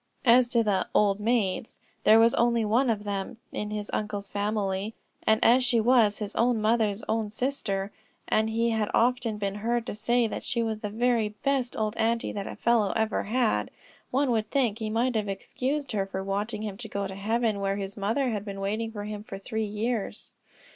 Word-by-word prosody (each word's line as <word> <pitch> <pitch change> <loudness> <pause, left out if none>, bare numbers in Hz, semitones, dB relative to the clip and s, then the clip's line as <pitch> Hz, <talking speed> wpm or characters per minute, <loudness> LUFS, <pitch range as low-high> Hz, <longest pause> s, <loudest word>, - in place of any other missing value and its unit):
As 245 0 +6
to 235 -1 +2
the 195 -4 +1
"old 205 -1 +3
maids" 220 -2 0 0.3
there 220 - +8
was 230 +1 +5
only 235 -1 +2
one 240 +5 +2
of 210 -2 0
them 200 +2 -4
in 210 - -3
his 210 -1 -4
uncle's 205 -1 -2
family, 205 0 -2 0.3
and 220 0 +5
as 250 +3 +6
she 245 -2 +3
was 225 -3 +4
his 210 -2 -5
own 235 -1 +2
mother's 215 -1 +1
own 220 -1 0
sister, 205 -5 -2 0.4
and 220 0 +2
he 230 +1 +1
had 220 -2 0
often 240 -2 +2
been 200 -1 -2
heard 230 +3 -1
to - - -4
say 235 +3 +1
that 220 - -4
she 235 -1 -1
was 220 -1 -2
the 210 - -4
very 230 0 +1
best 255 +3 -1
old 215 0 -1
aunty 230 +1 +1
that 200 -1 -4
a - - -6
fellow 230 -4 +2
ever 220 0 +1
had, 215 - +1 0.4
one 270 0 +1
would 220 -2 0
think 240 -5 +1
he 220 -1 -2
might 235 +4 +1
have 210 -2 0
excused 265 +8 -3
her 195 -3 -1
for 190 0 -4
wanting 205 +3 -2
him 205 -3 -4
to 220 0 -7
go 200 -1 -2
to 190 - -5
heaven 220 +2 0
where 195 0 0
his 195 -1 -5
mother 225 +6 0
had 205 -3 -3
been 200 -2 -6
waiting 215 +3 -2
for 205 -2 -6
him 210 0 -5
for 215 -3 -7
three 220 +2 -3
years. 215 +1 -3
220 Hz, 205 wpm, -27 LUFS, 205-235 Hz, 0.4 s, there